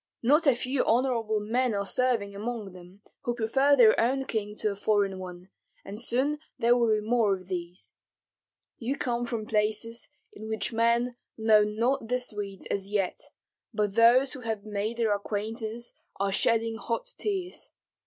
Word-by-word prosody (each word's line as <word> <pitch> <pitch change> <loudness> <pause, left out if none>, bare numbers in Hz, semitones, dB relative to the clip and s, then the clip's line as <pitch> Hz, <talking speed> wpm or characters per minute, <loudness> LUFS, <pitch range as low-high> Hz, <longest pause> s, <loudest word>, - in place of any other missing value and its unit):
Not 300 +6 +4
a 270 - +6
few 255 +2 -1
honorable 230 -3 +1
men 230 +2 0
are 200 0 -1
serving 230 -3 0
among 215 -1 -4
them, 185 +3 -14 0.2
who 240 - -2
prefer 265 +5 +3
their 230 -5 +6
own 265 +3 +1
king 210 -4 -3
to 215 - 0
a - - -5
foreign 200 -2 +1
one, 180 0 -9 0.4
and 205 +3 -4
soon 265 +5 0 0.2
there 235 +1 +4
will 235 -2 +2
be 215 -1 +1
more 225 -4 +3
of 185 0 -13
these. 175 0 -5 0.9
You 255 +4 -2
come 240 -2 -1
from 230 -3 -3
places 220 +2 -1 0.2
in 215 +1 -9
which 220 +1 -2
men 235 +2 +2 0.2
know 220 -1 +5
not 230 +4 0
the 250 +2 +1
Swedes 205 -6 -4
as 195 0 -2
yet, 200 -3 -1 0.6
but 210 -2 0
those 240 +4 +5
who 275 - -7
have 220 -3 -4
made 210 +2 -3
their 225 -3 +2
acquaintance 220 +3 -4 0.3
are 195 0 +1
shedding 225 +2 +2
hot 230 0 -3
tears. 380 -3 -3
225 Hz, 165 wpm, -28 LUFS, 205-240 Hz, 0.9 s, a